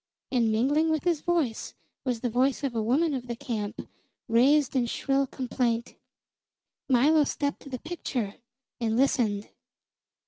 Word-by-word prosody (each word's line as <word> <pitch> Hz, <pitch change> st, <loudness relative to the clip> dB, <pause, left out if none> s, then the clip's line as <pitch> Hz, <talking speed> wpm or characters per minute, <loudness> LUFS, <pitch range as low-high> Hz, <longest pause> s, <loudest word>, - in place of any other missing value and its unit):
And 235 Hz, -4 st, +2 dB
mingling 285 Hz, +9 st, +2 dB
with 315 Hz, -2 st, 0 dB
his 340 Hz, -4 st, +1 dB
voice 320 Hz, -10 st, -1 dB, 0.3 s
was 245 Hz, -3 st, -1 dB
the 245 Hz, -, 0 dB
voice 260 Hz, +4 st, +1 dB
of 270 Hz, -3 st, -1 dB
a 225 Hz, -, 0 dB
woman 285 Hz, +8 st, +2 dB
of 250 Hz, -2 st, -4 dB
the 235 Hz, -, -3 dB
camp, 215 Hz, -3 st, -4 dB, 0.4 s
raised 265 Hz, +4 st, +4 dB
in 245 Hz, -2 st, +2 dB
shrill 275 Hz, +3 st, 0 dB
complaint. 240 Hz, -2 st, -2 dB, 1.0 s
Milo 290 Hz, +5 st, +5 dB
stepped 285 Hz, 0 st, -2 dB
to 280 Hz, -, -11 dB
the 255 Hz, -, -4 dB
picture 250 Hz, -, -4 dB, 0.4 s
and 225 Hz, -1 st, 0 dB
listened. 225 Hz, -6 st, +1 dB
255 Hz, 145 wpm, -27 LUFS, 230-285 Hz, 1.0 s, Milo